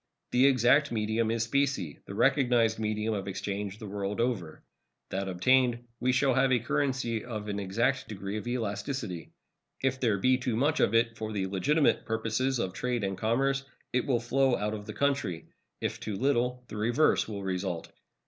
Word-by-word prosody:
The 125 +2 +5
exact 135 +2 +4
medium 110 0 0
is 115 0 +1
specie, 135 - 0
the 100 - -7
recognized 120 -3 +3
medium 110 0 -1
of 100 -2 -3
exchange 100 +1 -4
the 110 - -9
world 100 +1 -3
over. 110 -10 -2 0.5
That 95 +1 -2
obtained, 120 +6 +2
we 130 - +2
shall 130 +1 +3
have 130 +1 +3
a 125 - +5
currency 120 -2 -1
of 110 -3 -5
an 100 -1 -2
exact 115 +7 0
degree 100 -1 -5
of 110 - -6
elasticity. 110 - -3 0.5
If 130 -1 +1
there 115 -6 +2
be 130 +6 +3
too 125 -2 -1
much 145 +6 +2
of 115 - +3
it 115 0 +3
for 110 0 -4
the 100 -3 -1
legitimate 140 - +2
purposes 115 +4 0
of 95 -5 -2
trade 125 -1 -2
and 95 0 -1
commerce, 135 +6 +1 0.3
it 125 - +1
will 125 -4 +2
flow 130 +2 +2
out 105 +1 -2
of 105 -1 -6
the - - -5
country. 140 -12 -1 0.4
If - - -2
too 105 - -4
little, 125 +1 0
the 105 - -7
reverse 120 +8 +2
will 100 -2 -5
result. 90 -2 -3
115 Hz, 180 wpm, -29 LUFS, 105-130 Hz, 0.5 s, The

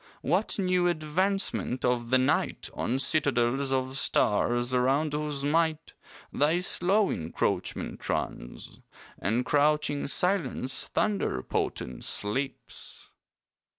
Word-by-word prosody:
What 180 +9 +1
new 180 -2 +2
advancement 175 -4 0
of 120 -1 0
the 130 - +5
night 130 - 0
On 125 - -1
citadels 135 -2 +1
of 130 0 0
stars 120 +4 +2
around 135 +5 +2
whose 150 -2 -2
might 160 +1 0 0.4
Thy 150 +4 +2
slow 195 +3 +2
encroachment 80 +1 -2
runs, - - -4 0.4
And 115 +5 0
crouching 145 0 +2
silence, 145 -6 0
thunder 200 - 0
potent, 65 - -3
sleeps? 130 +7 -3
140 Hz, 100 wpm, -28 LUFS, 125-165 Hz, 0.4 s, the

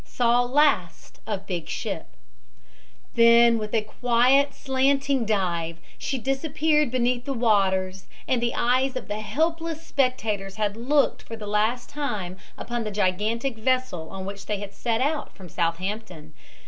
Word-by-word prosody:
SAW 245 0 +2
LAST 245 - +1
OF 200 -3 -3
BIG 175 -4 -4
SHIP - - -4 1.1
Then 235 0 +6
with 210 -1 -5
a 220 - +2
quiet, 250 +5 +3
slanting 270 -1 +1
dive 170 -6 -1 0.2
she 270 - -2
disappeared 295 +3 +1
beneath 245 0 0
the 275 - -2
waters, 190 -5 +1 0.2
and 250 -2 +1
the 235 0 -1
eyes 255 +2 +2
of 255 - -5
the 210 0 -3
helpless 325 +6 -2
spectators 220 -8 -1
had 210 -1 -1
looked 275 +5 +1
for 225 - -8
the 220 -2 -8
last 215 +4 0
time 210 -11 -4 0.2
upon 240 -1 -3
the 215 - -3
gigantic 210 +5 0
vessel 255 -9 0
on 190 -1 -6
which 200 0 -7
they 210 - -1
had 200 -1 -7
set 230 +1 -1
out 290 +2 -1
from 185 - -11
Southampton. 175 -1 -3
230 Hz, 150 wpm, -25 LUFS, 200-260 Hz, 1.1 s, Then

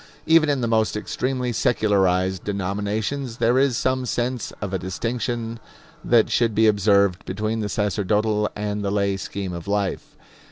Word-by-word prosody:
Even 160 -1 +5
in 140 -3 +1
the 120 - 0
most 110 -1 +1
extremely 125 +2 -2
secularized 95 -5 +1
denominations, 105 +6 -2
there 120 +2 +3
is 135 -4 +2
some 130 0 0
sense 125 0 -2
of 100 -2 -5
a 95 - 0
distinction 115 +4 -3 0.4
that 115 -2 +3
should 115 -3 +2
be 110 - +4
observed 100 -3 +3
between 110 +4 -2
the 105 -1 -2
sacerdotal 105 +1 0
and 105 0 -3
the 100 - -1
lay 100 -1 +1
scheme 95 -1 -5
of 85 +1 -7
life. 100 -2 -2
105 Hz, 155 wpm, -23 LUFS, 100-120 Hz, 0.4 s, Even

